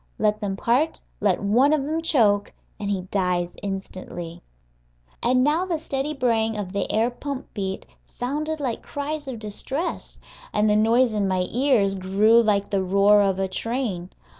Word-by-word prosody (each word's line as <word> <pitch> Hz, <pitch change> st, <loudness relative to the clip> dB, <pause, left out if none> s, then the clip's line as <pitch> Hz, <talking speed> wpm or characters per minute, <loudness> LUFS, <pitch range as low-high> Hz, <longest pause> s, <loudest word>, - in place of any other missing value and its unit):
Let 210 Hz, 0 st, +1 dB
them 200 Hz, -2 st, -2 dB
part, 255 Hz, +10 st, +1 dB, 0.2 s
let 200 Hz, -2 st, +1 dB
one 245 Hz, +9 st, +4 dB
of 300 Hz, -3 st, +1 dB
them 315 Hz, +3 st, -2 dB
choke, 210 Hz, -10 st, +2 dB, 0.3 s
and 200 Hz, -, -3 dB
he 195 Hz, -2 st, 0 dB
dies 180 Hz, -3 st, 0 dB
instantly. 185 Hz, -3 st, -6 dB, 0.8 s
And 255 Hz, +1 st, +3 dB
now 305 Hz, +5 st, +2 dB
the 340 Hz, -3 st, 0 dB
steady 280 Hz, -1 st, -3 dB
braying 225 Hz, -4 st, +1 dB
of 195 Hz, -2 st, -5 dB
the 200 Hz, -, -1 dB
air 225 Hz, +3 st, +2 dB
pump 275 Hz, +2 st, -6 dB
beat 195 Hz, -2 st, -4 dB, 0.2 s
sounded 300 Hz, +5 st, -3 dB
like 255 Hz, -5 st, -2 dB
cries 290 Hz, +1 st, -5 dB
of 260 Hz, -3 st, -4 dB
distress, 265 Hz, -, -5 dB, 0.4 s
and 210 Hz, 0 st, +2 dB
the 210 Hz, -, +3 dB
noise 230 Hz, +3 st, +3 dB
in 205 Hz, -2 st, 0 dB
my 185 Hz, -1 st, +1 dB
ears 240 Hz, -6 st, +3 dB
grew 200 Hz, +5 st, +4 dB
like 205 Hz, -3 st, +1 dB
the 195 Hz, -1 st, +1 dB
roar 200 Hz, +2 st, +5 dB
of 195 Hz, -2 st, +1 dB
a 190 Hz, 0 st, 0 dB
train. 200 Hz, -3 st, -3 dB
215 Hz, 165 wpm, -24 LUFS, 195-265 Hz, 0.8 s, roar